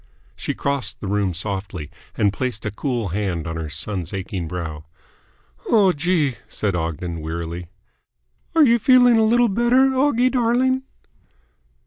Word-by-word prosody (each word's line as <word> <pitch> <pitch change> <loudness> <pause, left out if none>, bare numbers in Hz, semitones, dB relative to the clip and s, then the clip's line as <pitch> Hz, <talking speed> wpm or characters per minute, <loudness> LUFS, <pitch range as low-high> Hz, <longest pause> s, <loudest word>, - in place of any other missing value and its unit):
She - - -4
crossed 140 -3 -1
the - - -7
room 100 -1 0
softly, 95 -4 -5 0.3
and 100 -3 +2
placed 125 -3 -3
a 105 - -1
cool 120 -3 -2
hand 90 -3 -2
on 80 0 -4
her 80 -2 -4
son's 90 +2 -4
aching 95 -3 -4
brow. 80 -3 -5 0.8
"Oh, 200 -4 +5
Gee," 155 -5 0
said 100 -2 -2
Ogden 85 0 -3
wearily. 85 +2 -5 0.9
"Are 320 -2 +7
you 235 -2 +4
feeling 245 -1 +6
a - - +4
little 240 +2 +4
better, 240 +5 +3
Oggie 255 -2 +3
darling?" 255 +1 +2
105 Hz, 140 wpm, -22 LUFS, -, 0.9 s, Are